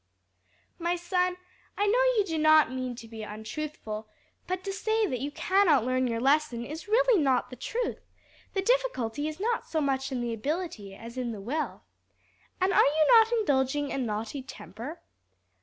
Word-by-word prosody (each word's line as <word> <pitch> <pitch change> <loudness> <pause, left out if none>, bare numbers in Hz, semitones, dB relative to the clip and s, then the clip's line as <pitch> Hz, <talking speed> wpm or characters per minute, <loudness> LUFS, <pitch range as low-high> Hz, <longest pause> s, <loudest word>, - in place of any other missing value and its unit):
"My 345 +1 0
son, 360 +1 0 0.4
I 410 - +2
know 435 +4 +3 0.2
you 420 - +5
do 325 -4 -2
not 310 -2 +6
mean 255 -1 -3
to 230 -1 -10
be 225 -1 -8
untruthful, 215 0 -6 0.4
but 370 0 -2
to 390 - -3
say 435 +2 +1
that 255 -11 -2
you 280 +4 -2
cannot 340 - +3
learn 255 0 +1
your 230 -1 -1
lesson 270 -2 +2
is 315 - -7
really 465 -2 +4
not 265 -3 +1
the - - -7
truth; 460 - -3 0.6
the 385 - +1
difficulty 340 - 0
is 310 +2 -6
not 460 +3 -1
so 320 - -1
much 270 -2 0
in 255 - -2
the 235 -1 -2
ability 235 - -4
as 235 +4 -8
in 240 -2 -2
the 210 - -7
will. 275 +10 -3 0.8
And 375 +1 +2
are - - +6
you 310 +2 +3
not 455 -1 +7
indulging 290 - +1
a - - -2
naughty 225 +3 -3
temper?" 250 - -9
290 Hz, 175 wpm, -28 LUFS, 240-370 Hz, 0.8 s, not